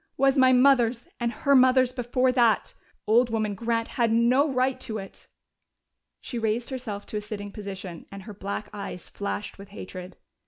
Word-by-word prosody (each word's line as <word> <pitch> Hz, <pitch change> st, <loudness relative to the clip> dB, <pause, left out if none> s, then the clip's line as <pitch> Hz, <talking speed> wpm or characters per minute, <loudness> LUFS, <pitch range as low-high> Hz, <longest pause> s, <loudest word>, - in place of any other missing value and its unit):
Was 270 Hz, 0 st, +3 dB
my 260 Hz, -2 st, +5 dB
mother's, 250 Hz, -2 st, +4 dB
and 235 Hz, -1 st, 0 dB
her 280 Hz, +3 st, +1 dB
mother's 255 Hz, -1 st, +5 dB
before 255 Hz, 0 st, +1 dB
that. 240 Hz, -4 st, +2 dB, 0.3 s
Old 235 Hz, +3 st, +4 dB
woman 215 Hz, -2 st, -1 dB
Grant 230 Hz, +2 st, -1 dB
had 235 Hz, -2 st, 0 dB
no 250 Hz, +6 st, +3 dB
right 255 Hz, 0 st, +1 dB
to 220 Hz, -2 st, -5 dB
it." 195 Hz, -1 st, -10 dB, 0.9 s
She 240 Hz, -, -5 dB
raised 225 Hz, +3 st, -1 dB
herself 225 Hz, -6 st, -5 dB
to 215 Hz, -, -5 dB
a -, -, -2 dB
sitting 205 Hz, -1 st, -7 dB
position, 195 Hz, -5 st, -8 dB
and 195 Hz, -1 st, -9 dB
her 210 Hz, -, -9 dB
black 200 Hz, +1 st, -5 dB
eyes 200 Hz, -3 st, -7 dB
flashed 200 Hz, 0 st, -5 dB
with 200 Hz, 0 st, -11 dB
hatred. 185 Hz, -2 st, -9 dB
230 Hz, 170 wpm, -26 LUFS, 205-255 Hz, 0.9 s, my